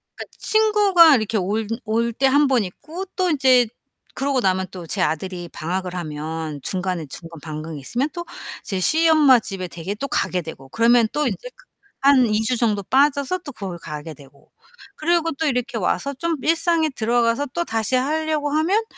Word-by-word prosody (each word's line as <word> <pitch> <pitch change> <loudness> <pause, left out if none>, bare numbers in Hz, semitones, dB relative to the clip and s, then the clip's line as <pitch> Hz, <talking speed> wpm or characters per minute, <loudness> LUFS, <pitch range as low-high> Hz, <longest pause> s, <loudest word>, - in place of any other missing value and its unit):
그니까 - - -7
친구가 410 -8 +5
이렇게 220 -1 -1
올 205 +3 -1 0.2
올 230 +2 0
때 270 +4 0
1 285 +2 +4
번 250 -5 +2
있고 320 - -7
또 370 -2 +1
인제 260 -5 +4 0.5
그러고 275 -1 0
나면 185 -1 +1
또 175 -3 -9
제 190 - -2
아들이 175 +2 -2
방학을 180 +2 -4
하면 155 -2 -5
중간에 185 -4 -2
중간 165 +2 -10
방학이 155 -1 -6
있으면 245 - -2
또 345 -1 -5 0.4
제 190 -2 -3
시엄마 310 - +5
집에 190 -4 -6
댁에 175 +4 -6
또 275 +6 -4
가게 180 -8 -1
되고. 135 -5 -10
그러면 230 - +4
또 300 0 0
인제 - - -4
그 - - -22 0.3
한 270 -2 +5
2 210 +1 +1
주 250 +3 +1
정도 210 -4 +1
빠져서 280 - +2
또 295 -4 -9
거기 190 -7 -6
가게 155 0 -7
되고. 140 0 -19 0.4
그리고 330 +1 +1
또 315 +2 -2
이렇게 250 -3 -1
와서 215 +7 -1
좀 330 +5 -2
일상에 330 0 +2
들어가서 240 +2 +1
또 345 0 -1
다시 225 +2 -1
하려고 305 +2 0
하면 355 +9 +2
235 Hz, 330 characters per minute, -22 LUFS, 185-300 Hz, 0.5 s, 친구가